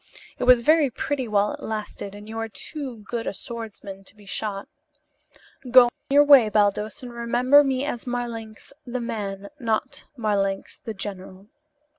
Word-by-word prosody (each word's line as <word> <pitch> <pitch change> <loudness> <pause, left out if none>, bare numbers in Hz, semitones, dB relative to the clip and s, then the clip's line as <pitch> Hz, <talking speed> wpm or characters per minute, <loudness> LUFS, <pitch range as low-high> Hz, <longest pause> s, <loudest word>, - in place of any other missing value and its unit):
It - - 0
was 250 -1 +7
very 305 +2 +4
pretty 265 +1 -3
while 205 -1 +2
it - - -8
lasted 210 -2 -5
and 205 +1 -11
you 225 +1 -5
are 225 0 -3
too 255 -1 -6
good 235 -1 -3
a - - -3
swordsman 215 -4 -7
to 200 - -11
be 210 -1 -18
shot. 200 0 -4 1.0
Go 245 -1 +8 0.2
your 285 +1 +6
way, 275 -7 +7
Baldos, 210 +4 +1
and 245 -1 -8
remember 245 +4 +4
me 270 0 0
as 250 -4 -4
Marlanx 235 -1 -5
the 250 0 -4
man, 200 -4 -4
not 240 +4 -2
Marlanx 200 -3 -1
the 225 - -7
general. 195 0 -7
225 Hz, 160 wpm, -24 LUFS, 205-250 Hz, 1.0 s, Go